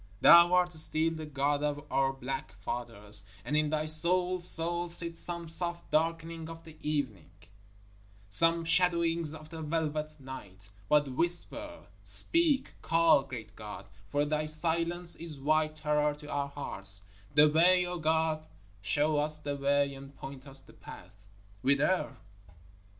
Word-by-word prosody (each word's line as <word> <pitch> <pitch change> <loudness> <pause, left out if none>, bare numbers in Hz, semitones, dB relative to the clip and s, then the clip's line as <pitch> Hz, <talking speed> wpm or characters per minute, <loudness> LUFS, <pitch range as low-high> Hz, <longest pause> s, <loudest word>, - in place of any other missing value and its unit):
Thou 170 +6 +8
art 180 0 +3
still 160 +1 +3
the 160 -1 -7
God 145 0 0
of 145 0 -2
our 135 0 +2
black 135 -6 -6
fathers, 105 0 -2 0.2
and 150 - -2
in 150 0 +2
Thy 155 0 -1
soul's 180 +3 +2
soul 175 +1 +1
sit 170 0 -1
some 170 0 -1
soft 170 +1 -4
darkenings 165 +1 -1
of 165 0 -10
the 160 -1 -13
evening, 130 - -3 1.0
some 165 +11 +3
shadowings 170 -2 +1
of 155 0 -12
the 160 -1 -7
velvet 155 -1 -3
night. 100 -7 -11 0.2
But 150 -1 +4
whisper 175 - -2 0.2
speak 325 -5 +2
call, 165 -3 +4
great 115 -5 -9
God, 105 -1 -9 0.2
for 145 0 +1
Thy 155 +1 -1
silence 170 +2 +2
is 165 -3 -9
white 155 +2 +1
terror 150 -1 0
to 150 0 -12
our 140 0 -2
hearts! 100 -8 -4 0.3
The 150 0 +7
way, 180 +4 +4
O 175 0 -4
God, 160 0 0 0.3
show 145 +9 +1
us 150 +1 +3
the 145 -1 -4
way 140 0 +1
and 135 +1 -12
point 135 +1 -10
us 135 0 -6
the - - -18
path. 100 +3 -14 0.3
Whither? 140 +2 +1
155 Hz, 145 wpm, -30 LUFS, 140-165 Hz, 1.0 s, Thou